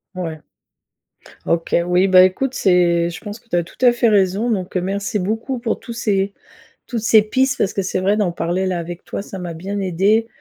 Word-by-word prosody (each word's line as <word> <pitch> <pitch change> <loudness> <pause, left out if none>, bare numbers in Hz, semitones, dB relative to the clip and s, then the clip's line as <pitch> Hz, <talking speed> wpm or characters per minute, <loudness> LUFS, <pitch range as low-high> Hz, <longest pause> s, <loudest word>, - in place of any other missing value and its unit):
Ouais. 165 -4 -5 1.1
OK, 165 0 -1
oui, 180 +2 +2
bah, 185 -1 +7
écoute 255 +8 0
c'est 175 -4 +2
je 170 - -8
pense 210 0 -7
que 230 -1 -32
tu - - -3
as 175 - +2
tout 170 - -15
à 245 - +7
fait 240 -1 +2
raison 200 +3 +2
donc, 190 -3 -2
heu, - - 0
merci 200 +3 -2
beaucoup 225 +7 -2
pour 230 -2 -2
tous 235 - -9
ces 200 -4 0 0.5
toutes 235 -3 -3
ces 220 0 +5
pistes 260 +4 0
parce 195 - 0
que 195 - -2
c'est 185 0 -2
vrai, 200 +3 +2
d'en 185 -5 0
parler 175 +3 -1
là 185 -2 -1
avec 175 +1 -7
toi, - - -5
ça 195 -1 -8
m'a 175 -2 -5
bien 195 +5 -5
aidé, 195 +5 +1
195 Hz, 220 wpm, -19 LUFS, 180-220 Hz, 1.1 s, bah